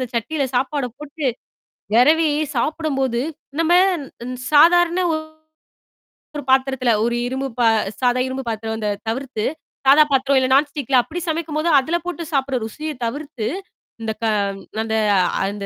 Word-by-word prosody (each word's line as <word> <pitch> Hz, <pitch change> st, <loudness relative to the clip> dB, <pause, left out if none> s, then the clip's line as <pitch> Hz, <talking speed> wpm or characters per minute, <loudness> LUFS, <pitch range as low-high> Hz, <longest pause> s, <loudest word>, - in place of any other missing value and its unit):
அந்தச் 250 Hz, -1 st, -4 dB
சட்டியில 280 Hz, +4 st, -2 dB
சாப்பாடப் 260 Hz, -2 st, -1 dB
போட்டு 300 Hz, -1 st, -5 dB, 0.7 s
விரவி 310 Hz, +6 st, +5 dB, 0.3 s
சாப்பிடும்போது, 270 Hz, -3 st, -1 dB, 0.4 s
நம்ம 330 Hz, +1 st, +3 dB, 0.8 s
சாதாரண 350 Hz, +4 st, +5 dB
ஒரு 315 Hz, 0 st, -8 dB, 0.9 s
பாத்திரத்தில 265 Hz, -2 st, +2 dB
ஒரு 235 Hz, 0 st, 0 dB
இரும்பு 265 Hz, +2 st, -3 dB
பா 235 Hz, -, +4 dB, 0.3 s
சாதா 250 Hz, 0 st, +2 dB
இரும்பு 260 Hz, +1 st, -4 dB
பாத்திரம் 220 Hz, 0 st, -3 dB
இந்த 210 Hz, -, -1 dB, 0.2 s
தவிர்த்து, 245 Hz, -2 st, -3 dB, 0.4 s
சாதா 295 Hz, +3 st, +8 dB
பாத்திரம் 270 Hz, 0 st, +3 dB
இல்ல 260 Hz, 0 st, 0 dB
நான்ஸ்டிக்ல 280 Hz, -2 st, +1 dB
அப்படி 330 Hz, +7 st, -6 dB
சமைக்கும்போது 315 Hz, 0 st, -1 dB
அதுல 320 Hz, +6 st, -1 dB
போட்டுச் 340 Hz, -2 st, -5 dB
சாப்பிற 270 Hz, -1 st, 0 dB
ருசியைத் 300 Hz, +3 st, -6 dB
தவிர்த்து, 275 Hz, -2 st, -4 dB, 0.6 s
இந்த 220 Hz, -, -1 dB
க -, -, +2 dB, 0.6 s
அந்த 220 Hz, 0 st, -2 dB, 0.5 s
அந்த 200 Hz, 0 st, -5 dB
275 Hz, 125 wpm, -20 LUFS, 245-315 Hz, 0.9 s, சாதா